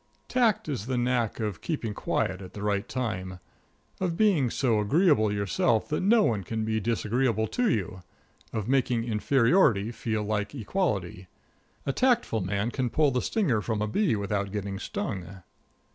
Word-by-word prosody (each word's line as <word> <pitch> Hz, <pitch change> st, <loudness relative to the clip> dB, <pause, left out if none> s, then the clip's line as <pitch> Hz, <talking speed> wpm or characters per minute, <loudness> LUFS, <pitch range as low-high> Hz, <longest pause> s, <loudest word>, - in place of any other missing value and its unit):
Tact 225 Hz, -4 st, +2 dB
is 125 Hz, -7 st, -3 dB
the 130 Hz, -1 st, -1 dB
knack 120 Hz, -2 st, 0 dB
of 105 Hz, -4 st, -3 dB
keeping 125 Hz, -10 st, -3 dB
quiet 95 Hz, -1 st, -1 dB
at 95 Hz, -1 st, -11 dB
the 105 Hz, -, -6 dB
right 100 Hz, -1 st, -1 dB
time; 95 Hz, -7 st, -3 dB, 0.6 s
of 175 Hz, -3 st, -1 dB
being 185 Hz, -, +3 dB
so 115 Hz, -3 st, +1 dB
agreeable 125 Hz, -, +3 dB
yourself 105 Hz, +4 st, +1 dB
that 150 Hz, -, -1 dB
no 215 Hz, +3 st, +4 dB
one 105 Hz, -, 0 dB
can 110 Hz, +3 st, -3 dB
be 110 Hz, 0 st, 0 dB
disagreeable 115 Hz, +1 st, 0 dB
to 245 Hz, -2 st, +1 dB
you; 95 Hz, -, -2 dB, 0.5 s
of 110 Hz, -2 st, -3 dB
making 125 Hz, -3 st, +1 dB
inferiority 115 Hz, -, +3 dB
feel 110 Hz, -2 st, -2 dB
like 105 Hz, +3 st, -2 dB
equality. 105 Hz, -, -2 dB, 0.6 s
A 140 Hz, -, 0 dB
tactful 245 Hz, -, +2 dB
man 100 Hz, +5 st, -1 dB
can 130 Hz, -2 st, -1 dB
pull 150 Hz, +2 st, +2 dB
the 125 Hz, -1 st, 0 dB
stinger 155 Hz, -, +1 dB
from 110 Hz, 0 st, -2 dB
a 105 Hz, -, 0 dB
bee 180 Hz, -, +1 dB
without 100 Hz, -1 st, -2 dB
getting 100 Hz, -1 st, -4 dB
stung. 95 Hz, -3 st, -5 dB
110 Hz, 160 wpm, -27 LUFS, 105-140 Hz, 0.6 s, no